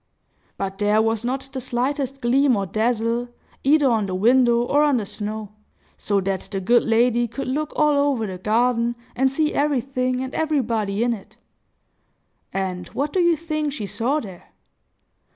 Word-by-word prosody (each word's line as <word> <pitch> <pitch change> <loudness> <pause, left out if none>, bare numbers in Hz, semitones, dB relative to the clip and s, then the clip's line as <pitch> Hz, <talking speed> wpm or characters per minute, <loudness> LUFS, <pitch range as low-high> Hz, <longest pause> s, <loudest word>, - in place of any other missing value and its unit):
But 195 0 -4
there 210 +1 +3
was 225 0 +1
not 265 +2 -2
the 260 - -4
slightest 265 +2 -2
gleam 260 +2 +3
or 200 -1 -1
dazzle, 230 +3 0 0.3
either 290 +1 +4
on 220 -5 +1
the 185 - -3
window 240 +3 +4
or 285 +4 +2
on 295 -3 +3
the 215 - -2
snow; 210 +1 -5 0.5
so 205 -1 0
that 190 0 -1
the 195 - -2
good 235 +6 +4
lady 240 +1 +2
could 275 +4 -6
look 300 +4 -2
all 300 -1 +3 0.2
over 230 -5 -1
the 185 -3 -6
garden, 235 +3 +1 0.2
and 265 +1 +2
see 305 +2 0
everything 255 -2 0
and 260 - -6
everybody 230 -9 0
in 240 0 +1
it. 205 -4 -11 1.1
And 185 -2 -3
what 285 +2 -3
do 375 - +1
you 345 -2 +3
think 305 -2 -2
she 220 -8 -4
saw 245 +9 -1
there? 190 - -10
240 Hz, 170 wpm, -22 LUFS, 215-275 Hz, 1.1 s, either